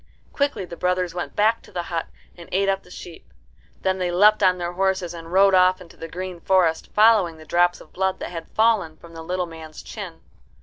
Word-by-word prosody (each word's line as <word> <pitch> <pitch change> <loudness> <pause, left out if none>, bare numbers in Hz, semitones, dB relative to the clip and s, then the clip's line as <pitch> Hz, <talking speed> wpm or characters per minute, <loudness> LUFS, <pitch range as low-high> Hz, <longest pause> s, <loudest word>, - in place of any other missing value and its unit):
Quickly 280 -9 -1
the 175 - -9
brothers 180 0 -1
went 175 0 -5
back 220 +2 +2
to - - -17
the 175 - -3
hut 165 -1 -3 0.3
and 170 -1 -13
ate 195 +1 +1
up 195 0 +1
the - - -20
sheep. 175 -2 -11 0.5
Then 190 0 0
they 180 -1 0
leapt 210 +4 +5
on 185 -2 +4
their 175 -1 -3
horses, 190 -2 0
and 165 -1 -9
rode 195 +1 +5
off 185 0 +5
into 180 -2 -14
the 165 - -8
green 180 +1 -6
forest, 175 -3 +1
following 210 -6 +4
the 155 - -13
drops 175 +2 +2
of - - -17
blood 190 0 0
that - - -6
had 165 -2 -7
fallen 215 -8 +1
from 170 0 -15
the 165 - -8
little 180 +2 -2
man's 160 -2 -10
chin. - - -8
180 Hz, 220 wpm, -23 LUFS, 170-190 Hz, 0.5 s, leapt